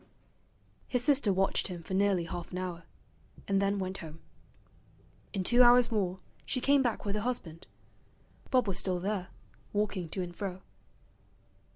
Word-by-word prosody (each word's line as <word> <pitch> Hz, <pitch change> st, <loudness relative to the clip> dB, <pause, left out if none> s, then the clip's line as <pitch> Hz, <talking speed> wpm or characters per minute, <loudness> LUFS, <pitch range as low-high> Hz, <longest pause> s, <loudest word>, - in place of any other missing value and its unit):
His 250 Hz, -2 st, 0 dB
sister 280 Hz, -7 st, +3 dB
watched 195 Hz, +1 st, +1 dB
him 175 Hz, -3 st, -7 dB
for 190 Hz, -, -6 dB
nearly 195 Hz, -2 st, +2 dB
half 170 Hz, +1 st, -6 dB
an 180 Hz, -, -4 dB
hour, 180 Hz, -2 st, -5 dB, 0.6 s
and 195 Hz, -1 st, +2 dB
then 200 Hz, +1 st, +1 dB
went 190 Hz, 0 st, -3 dB
home. 160 Hz, -1 st, -9 dB, 1.1 s
In 195 Hz, -3 st, -2 dB
two 240 Hz, +6 st, +5 dB
hours 245 Hz, 0 st, +7 dB
more 190 Hz, -4 st, 0 dB, 0.3 s
she 255 Hz, -, -2 dB
came 275 Hz, +2 st, +4 dB
back 240 Hz, -5 st, -1 dB
with 200 Hz, -, -1 dB
her 210 Hz, -, -1 dB
husband. 195 Hz, -9 st, -4 dB, 0.8 s
Bob 255 Hz, -4 st, +3 dB
was 195 Hz, -, 0 dB
still 185 Hz, -2 st, -1 dB
there, 190 Hz, 0 st, -2 dB, 0.5 s
walking 200 Hz, -5 st, -1 dB
to 185 Hz, +3 st, -3 dB
and 175 Hz, -1 st, -8 dB
fro. 190 Hz, -1 st, -5 dB
195 Hz, 160 wpm, -31 LUFS, 180-225 Hz, 1.1 s, hours